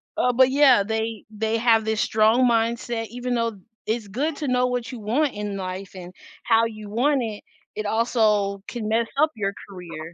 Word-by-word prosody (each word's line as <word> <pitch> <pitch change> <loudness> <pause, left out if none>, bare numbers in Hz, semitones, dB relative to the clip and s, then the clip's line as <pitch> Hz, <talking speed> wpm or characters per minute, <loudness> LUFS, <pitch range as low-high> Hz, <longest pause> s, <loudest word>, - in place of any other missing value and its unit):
Uh, 250 - +2
but, 260 +1 +4
yeah, 270 -7 +5
they 220 +1 -3
they 220 +1 -1
have 225 -1 +3
this 220 -1 -1
strong 220 +4 +3
mindset, 230 0 0
even 245 +1 -4
though 230 -3 -1 0.3
it's 220 -1 -2
good 280 +10 -2
to 295 - -4
know 250 0 +2
what 245 -1 -3
you 245 - -7
want 255 +8 0
in 205 -1 -4
life 185 0 -6
and 180 -1 -9 0.3
how 230 -1 +3
you 215 -2 -7
want 255 +5 +1
it, 215 -2 -6 0.3
it 215 -1 -3
also 210 -3 +1
can 230 -3 -5
mess 230 +1 +1
up 310 +2 +3
your 200 -2 -2
career. 170 -4 -9
225 Hz, 190 wpm, -23 LUFS, 210-245 Hz, 0.3 s, yeah